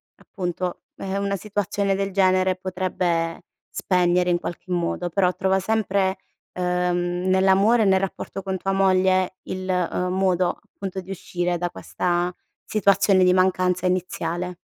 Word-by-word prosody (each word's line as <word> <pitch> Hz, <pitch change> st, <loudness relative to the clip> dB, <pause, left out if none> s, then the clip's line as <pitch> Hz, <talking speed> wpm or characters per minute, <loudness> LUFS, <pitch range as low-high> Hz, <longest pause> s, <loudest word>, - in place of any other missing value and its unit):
appunto 180 Hz, -2 st, -4 dB, 0.2 s
è 195 Hz, 0 st, -4 dB
una 200 Hz, 0 st, -1 dB
situazione 200 Hz, 0 st, -1 dB
del 195 Hz, 0 st, -1 dB
genere 185 Hz, -1 st, +3 dB
potrebbe 180 Hz, -3 st, -2 dB, 0.3 s
spegnere 180 Hz, -1 st, +1 dB
in 175 Hz, -, +2 dB
qualche 175 Hz, +1 st, -7 dB
modo 175 Hz, 0 st, -1 dB
però, 180 Hz, +1 st, +2 dB
trova 190 Hz, 0 st, +1 dB
sempre, 195 Hz, -2 st, 0 dB, 0.4 s
ehm, 180 Hz, 0 st, -1 dB
nell'amore 195 Hz, +5 st, +4 dB
e -, -, +2 dB
nel 190 Hz, -1 st, +4 dB
rapporto 195 Hz, 0 st, -4 dB
con 190 Hz, 0 st, -3 dB
tua 195 Hz, +1 st, -2 dB
moglie 185 Hz, -1 st, +2 dB
il, 185 Hz, 0 st, -5 dB
ehm, 180 Hz, 0 st, 0 dB
modo 185 Hz, -1 st, +2 dB, 0.2 s
appunto 195 Hz, -1 st, -5 dB
di 190 Hz, +1 st, -9 dB
uscire 175 Hz, -1 st, -2 dB
da 175 Hz, 0 st, -1 dB
questa 175 Hz, 0 st, -2 dB, 0.3 s
situazione 195 Hz, -2 st, +3 dB
di 180 Hz, 0 st, +5 dB
mancanza 185 Hz, -1 st, +2 dB
iniziale. 180 Hz, -1 st, -2 dB
185 Hz, 140 wpm, -23 LUFS, 180-195 Hz, 0.4 s, di